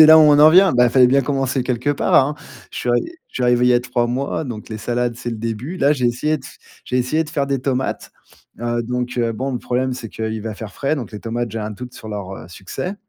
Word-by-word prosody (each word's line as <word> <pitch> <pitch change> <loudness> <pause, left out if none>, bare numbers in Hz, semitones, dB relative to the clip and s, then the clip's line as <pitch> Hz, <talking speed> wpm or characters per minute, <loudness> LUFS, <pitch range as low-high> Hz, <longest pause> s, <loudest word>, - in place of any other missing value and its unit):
c'est 155 - +11
là, 160 +1 +9
où, 155 - +8
on 150 -1 +6
en 150 +1 +9
vient! 185 +2 +6
Bah, 125 0 +5
il 120 - +3
fallait 125 0 +6
bien 135 +3 +4
commencer 135 -1 -1
quelque 125 +2 -1
part, 145 - 0
hein? 145 +3 +4 0.4
Je - - -6
suis - - -3 0.4
je - - -31
suis 130 - -2
arrivé 125 0 +3
il - - +5
y 125 - +5
a 120 - +4
3 125 -1 -1
mois, 135 +6 -2
donc 115 -6 -7
les 110 - -4
salades, 120 +1 -1
c'est 120 0 -5
le 115 - -4
début. 115 - -4
Là, 145 -4 +3
j'ai 130 -4 0
essayé 150 +6 0
de - - -16
f - - -12 0.3
j'ai 125 - -2
essayé 155 +6 +1
de 150 - -10
faire 145 -3 -1
des 135 -2 -1
tomates. 130 -1 -2 0.5
Heu, 120 0 -1
donc, 125 +1 -3
heu, 115 -1 +1
bon, 130 +5 -3
le 125 - -2
problème, 130 +2 -1
c'est 125 -2 -6
qu'il 110 0 -4
va 110 -1 -4
faire 105 0 -8
frais, 145 +3 -1
donc 115 -6 -6
les 105 - -7
tomates, 120 0 -3
j'ai 115 - -4
un 105 0 -4
doute 125 +4 -8
sur 110 - -10
leur, 100 -3 -5
heu, 80 - -11
succès. 95 - -6
125 Hz, 285 wpm, -20 LUFS, 115-140 Hz, 0.5 s, c'est